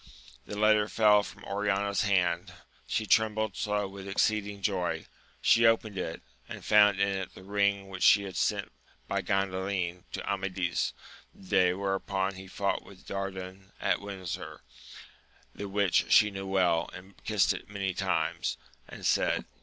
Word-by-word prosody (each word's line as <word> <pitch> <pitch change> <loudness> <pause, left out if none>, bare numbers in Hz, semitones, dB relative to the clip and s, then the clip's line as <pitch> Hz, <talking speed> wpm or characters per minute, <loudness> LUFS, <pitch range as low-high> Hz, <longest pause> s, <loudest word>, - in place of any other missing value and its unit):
The 105 - -6
letter 105 0 +4
fell 105 -2 +5
from - - -10
Oriana's 100 0 0
hand, 90 -4 +1 0.4
she 110 - -1
trembled 110 -1 +2
so 105 -1 -1
with 95 0 -9
exceeding 100 0 0
joy: 95 -3 -1 0.4
she 115 0 +6
opened 110 -2 +2
it, 85 -3 -4 0.3
and - - -8
found 105 -2 +5
in 100 - +3
it 95 -1 -4
the - - -12
ring 100 0 +1
which 95 -1 -8
she 100 - +6
had 95 -2 -7
sent - - 0 0.4
by - - -1
Gandalin 95 -2 -1
to - - -5
Amadis, 95 -3 -1 0.4
the - - -17
day 90 -3 +4
whereon 95 0 -1
he 95 0 -10
fought 100 +1 -1
with 95 -2 -16
Dardan 95 0 -6
at - - +1
Windsor, 95 -3 -6 0.9
the 100 -1 -6
which 100 -2 +2
she 105 -1 +6
knew 95 0 -6
well 90 -3 +2
and 95 +2 -14
kissed 105 -4 +2
it - - -9
many 100 -2 -2
times, 85 -3 -1 0.3
and - - -9
said. - - +2
100 Hz, 155 wpm, -29 LUFS, 95-105 Hz, 0.9 s, she